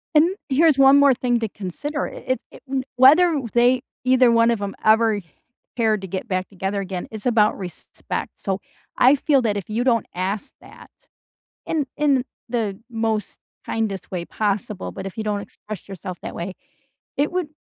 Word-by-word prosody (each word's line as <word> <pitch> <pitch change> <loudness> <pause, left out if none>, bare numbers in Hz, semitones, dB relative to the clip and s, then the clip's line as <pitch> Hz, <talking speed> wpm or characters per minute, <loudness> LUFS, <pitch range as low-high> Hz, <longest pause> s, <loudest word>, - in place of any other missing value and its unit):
And, 335 +5 +5
here's 300 +1 +4
one 275 +1 +7
more 280 -1 +6
thing 245 -1 +1
to 225 -2 -2
consider. 270 - -4
I - - -10
it's 255 0 0
it - - -14 0.3
whether 305 +4 +6
they 245 +1 +4 0.2
either 255 -1 +5
one 230 0 +4
of 225 -3 -1
'em 200 -1 -4
ever 220 -1 +4 0.5
cared 220 -3 +1
to 190 - -6
get 190 +5 -4
back 185 -2 -1
together 195 +1 -3
again, 185 -2 -5
it's 215 -2 -6
about 225 -4 +3
respect. 180 -4 -6
So, 195 -1 -3 0.4
I 260 +3 +6
feel 280 -1 +2
that 215 -4 0
if 200 - -6
you 225 +3 0
don't 235 -4 +2
ask 190 +3 -3
that - - -15 0.8
in 300 -4 0
in 275 -4 +2 0.2
the 220 -5 -2
most 225 -3 -2 0.3
kindest 215 -4 -2
way 175 -2 -3
possible, 205 -1 -2
but 190 - -7
if 195 - -7
you 220 - -2
don't 205 -1 -1
express 205 0 -9
yourself 185 -2 -7
that - - -6
way, 180 +2 -5 0.6
it 285 +2 +1
would 360 -4 -1
225 Hz, 175 wpm, -22 LUFS, 195-260 Hz, 0.8 s, one